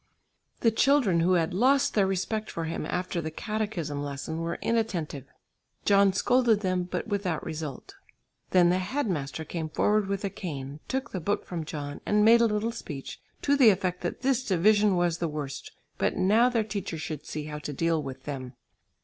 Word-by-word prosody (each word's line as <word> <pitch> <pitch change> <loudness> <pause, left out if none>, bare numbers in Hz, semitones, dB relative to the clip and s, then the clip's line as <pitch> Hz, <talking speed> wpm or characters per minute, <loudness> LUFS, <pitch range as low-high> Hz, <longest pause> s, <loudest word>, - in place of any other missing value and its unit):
The 230 - +4
children 235 -7 +3
who 175 +3 +3
had 170 -1 +1
lost 265 +8 +3
their 200 -3 +3
respect 210 +3 -2
for 165 - -4
him 160 -1 -3
after 180 -1 -2
the 160 - -3
catechism 175 -6 -3
lesson 145 +3 -4
were 165 0 -2
inattentive. 180 - -1 0.6
John 200 -1 +5
scolded 235 +2 +3
them, 185 -2 0
but - - -3
without 195 -6 -2
result. 155 -4 -6 0.6
Then 175 -2 +5
the 180 - +2
head 230 +9 -2
master 160 -3 -3
came 160 -2 -4
forward 210 +5 +2
with 200 +1 -2
a 195 - -2
cane; 150 -8 -6
took 265 0 -3
the 185 - -3
book 200 +5 -1
from 165 -3 -4
John 145 -2 -6
and 210 0 +3
made 230 +1 +7
a 230 - +5
little 215 +2 -1
speech, 150 - -7 0.2
to 285 - +3
the 260 -5 +7
effect 185 -2 0
that 175 - -4
this 260 -1 +2
division 205 +1 +3
was 175 -1 +1
the 170 - 0
worst, 150 -3 -5 0.3
but - - +1
now 220 +6 +4
their 230 -3 +1
teacher 200 -5 -4
should 155 -2 -6
see 150 - -4
how 150 0 -6
to 150 - -5
deal 165 +2 0
with 135 -2 -7
them. 130 -3 -6
185 Hz, 190 wpm, -28 LUFS, 155-215 Hz, 0.6 s, made